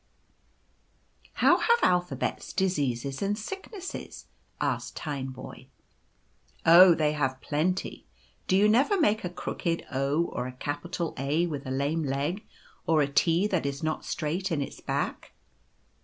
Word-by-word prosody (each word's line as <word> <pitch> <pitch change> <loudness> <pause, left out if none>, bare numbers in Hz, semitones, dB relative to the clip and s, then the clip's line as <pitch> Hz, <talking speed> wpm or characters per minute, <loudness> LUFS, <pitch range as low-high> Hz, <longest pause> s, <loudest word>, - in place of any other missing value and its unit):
i€ - - -36
How - - +4
have 470 0 +4
Alphabets 180 -1 0
diseases 140 -8 -1
and 205 +1 0
sicknesses? 385 - -7 0.2
" - - -40
asked - - -2
Tineboy. 135 -4 -5
u - - -30 1.0
Oh, 175 +1 +9
they 150 -2 +2
have 135 -3 -1
plenty. 170 +8 -2 0.4
Do 185 - +3
you 205 +2 +5
never 270 - +3
make 215 -8 +2
a 180 - -2
crooked 170 -1 -3
o 140 +4 +1
or 125 -6 -4
a 130 - -7
capital 145 +6 -4
A 145 +5 +1
with 145 -5 -5
a - - -4
lame 140 +5 0
leg, 145 +8 -2 0.4
or 155 -2 +4
a - - 0
T 165 +6 +2
that 185 -8 0
is 140 +2 -4
not 155 0 -1
straight 170 +5 -2
in 160 - 0
its 140 - -5
back - - -3
160 Hz, 150 wpm, -28 LUFS, 140-185 Hz, 1.0 s, Oh